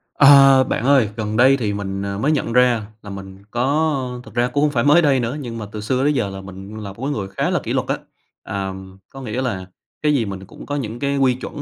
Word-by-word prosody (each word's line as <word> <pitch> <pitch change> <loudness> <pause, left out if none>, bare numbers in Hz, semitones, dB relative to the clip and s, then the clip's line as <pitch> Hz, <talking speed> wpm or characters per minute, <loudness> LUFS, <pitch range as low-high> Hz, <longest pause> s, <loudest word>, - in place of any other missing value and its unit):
Ờ, 135 -1 +7
bạn 125 - -2
ơi, 135 -6 +4
gần 110 -1 -2
đây 130 +2 +6
thì 105 -5 -1
mình, 95 -1 -4
ờ, 100 0 -3
mới 140 +9 +1
nhận 135 -6 -1
ra 125 -3 +3 0.2
là 100 - -10
mình 95 0 -9
có 135 0 0
thực - - -14
ra 120 +1 +1
cũng 125 +3 -1
hông 150 - +2
phải 120 -4 +1
mới 150 +4 +6
đây 140 -5 +3
nữa, 120 +4 -2
nhưng 120 -5 -6
mà 110 - -5
từ 105 - -6
xưa 125 +5 0
tới 145 +1 +3
giờ 115 -8 0
là 95 0 -7
mình 95 +2 -10
là 100 -2 -7
một 115 - -10
cái 140 - -1
người 105 -8 -3
khá 95 - -2
là - - +1
kỷ - - -3
luật - - -1
á. - - 0 0.5
À, 95 -1 -4 0.4
có 135 - -10
nghĩa 125 0 -3
là 100 -8 -3 0.4
cái 150 -1 +2
gì 125 -6 +1
mình 95 -1 -6
cũng - - -12
có 145 - -3
những 120 -4 -4
cái 140 +1 -1
quy 135 -2 +3
chuẩn, 130 +3 -7
120 Hz, 270 wpm, -20 LUFS, 100-135 Hz, 0.5 s, Ờ